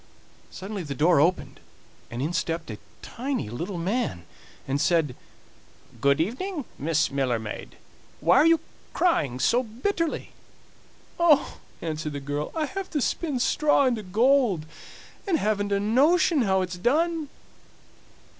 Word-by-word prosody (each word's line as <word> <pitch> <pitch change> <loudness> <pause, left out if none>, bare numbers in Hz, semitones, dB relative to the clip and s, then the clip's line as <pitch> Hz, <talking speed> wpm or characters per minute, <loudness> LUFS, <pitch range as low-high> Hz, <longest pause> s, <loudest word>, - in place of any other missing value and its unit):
Suddenly 195 +1 -6
the 145 -4 -5
door 160 +2 +4
opened, 175 +4 0 0.5
and 120 +3 -4
in 160 +4 -2
stepped 165 -5 -2
a 105 - -8 0.2
tiny 255 - -4
little 175 - -4
man 175 - -2 0.4
and 140 +2 0
said: 155 -5 +2 0.9
"Good 140 +1 +3
evening, 275 - -2
Miss 155 0 +1
Miller 135 -3 0
maid; 110 -2 -7 0.4
why 170 +4 +4
are 300 - +6
you 330 -1 +4 0.3
crying 145 - +1
so 235 - +3
bitterly?" 295 - -3 0.9
"Oh!" 315 -5 +3 0.2
answered 155 -2 -3
the 140 - -4
girl, 145 +2 -4
"I 315 -1 0
have 385 +4 -5
to 300 - -1
spin 290 +1 -1
straw 295 +2 +3
into 240 -4 +1
gold, 220 - +2 0.6
and 355 -4 +2
haven't 205 -4 0
a 200 - +2
notion 285 - +3
how 190 -4 +2
it's 180 0 -6
done." 315 - +1
200 Hz, 135 wpm, -26 LUFS, -, 0.9 s, are